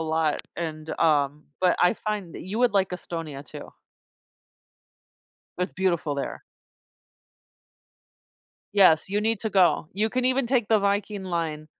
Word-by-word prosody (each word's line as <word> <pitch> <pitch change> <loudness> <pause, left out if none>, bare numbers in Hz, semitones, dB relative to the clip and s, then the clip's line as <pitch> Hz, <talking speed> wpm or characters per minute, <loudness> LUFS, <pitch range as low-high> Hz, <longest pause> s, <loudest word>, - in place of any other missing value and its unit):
lot, 160 -1 0
and, 160 -2 -5
um 150 -2 +2 0.2
but 180 -1 +3
I 180 - +4
find 210 -6 -4
that - - -7
you 195 +5 -4
would 245 -2 +3
like 195 -2 +2
Estonia 165 -5 -6
too. - - -10 1.9
It's 180 +1 -1
beautiful 170 -6 0
there. 140 - -4 2.3
Yes, 185 -5 +5
you 205 +1 +1
need 225 -1 0
to 220 - -2
go. 180 -5 +3
You 210 +3 +1
can 250 +2 -1
even 260 0 +2
take 240 -4 +1
the 220 -1 +5
Viking 200 0 -1
Line 165 -4 -3
185 Hz, 135 wpm, -25 LUFS, 160-210 Hz, 2.3 s, Yes